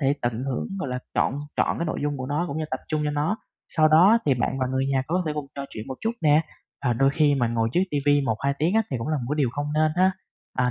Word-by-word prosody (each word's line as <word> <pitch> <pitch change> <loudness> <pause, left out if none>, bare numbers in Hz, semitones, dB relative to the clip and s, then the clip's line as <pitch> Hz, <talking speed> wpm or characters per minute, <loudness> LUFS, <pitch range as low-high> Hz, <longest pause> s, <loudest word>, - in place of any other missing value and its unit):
thể 140 0 +2
tận 120 +1 -1
hưởng, 135 -2 -2
gọi 165 - -2
là, 125 0 -2 0.2
trọn - - +1 0.2
trọn - - +1
cái 170 - -1
nội - - -2
dung 145 0 -1
của 130 -1 -5
nó, 145 +5 0
cũng 145 +3 -3
như 155 - -1
tập 130 - -2
trung 155 -1 0
cho 150 - 0
nó, 150 +8 0 0.3
sau 155 -1 +3
đó 180 +9 +6
thì 140 - +4
bạn 130 +2 -1
và 130 - 0
người 130 +1 0
nhà 135 -1 +2
có 180 +5 0
thể 155 - 0
cùng 150 -2 -4
trò 140 - -4
chuyện 110 - -7
một 130 - -4
chút 225 +1 0
nè. 150 +1 +5 0.4
Và 125 - +3
đôi 135 +4 +3
khi 145 -1 +3
mà 120 -4 +1
ngồi 115 -1 0
trước 180 - +3
ti 145 - 0
vi 145 0 +5
1-2 135 +2 0
tiếng 165 +7 +1
á 225 - +4
thì 130 - -1
cũng 115 - -4
là 155 - +1
một 125 - -4
cái 150 - 0
điều 135 -5 +3
không 145 +2 -3
nên 155 0 +3
ha, 190 +1 +4 0.5
à, 125 -1 +3
145 Hz, 305 wpm, -25 LUFS, 130-155 Hz, 0.5 s, đó